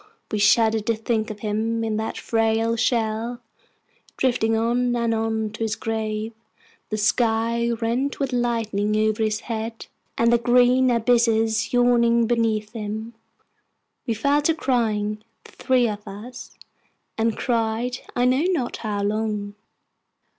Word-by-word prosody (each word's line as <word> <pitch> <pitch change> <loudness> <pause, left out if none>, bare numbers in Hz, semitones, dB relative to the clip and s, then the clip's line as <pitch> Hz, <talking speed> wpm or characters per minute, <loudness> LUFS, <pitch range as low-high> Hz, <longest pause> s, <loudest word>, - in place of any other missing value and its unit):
We 215 - -1
shuddered 220 0 +3
to 230 - +2
think 220 0 -1
of 210 -1 -8
him 225 +2 -1
in 220 -1 -1
that 220 0 -3
frail 225 0 +1
shell, 230 0 -1 0.8
drifting 225 -3 +1
on 240 +2 +1
and 235 -1 0
on 220 -1 -1
to 225 - -10
his 220 -1 -1
grave, 220 0 -3 0.6
the 215 - -2
sky 230 +2 +1
rent 235 +4 -1
with 270 -2 -2
lightning 225 -4 0
over 215 0 +1
his 215 -1 0
head, 225 0 -5 0.3
and 235 +1 +3
the 240 - +4
green 250 +2 +4
abysses 230 -2 +2
yawning 235 -1 +3
beneath 220 -2 0
him. 220 +1 -5 0.9
We 230 - 0
fell 280 +7 +2
to 320 +2 +2
crying, 215 -6 -1 0.2
the - - -16
three 255 -2 +1
of 210 -1 -6
us, 225 +6 -10 0.6
and 225 -1 0
cried 235 +1 -1 0.2
I 245 - +2
know 260 +6 +2
not 265 -9 -2
how 205 -2 -3
long. 210 -1 -2
225 Hz, 140 wpm, -23 LUFS, 220-240 Hz, 0.9 s, the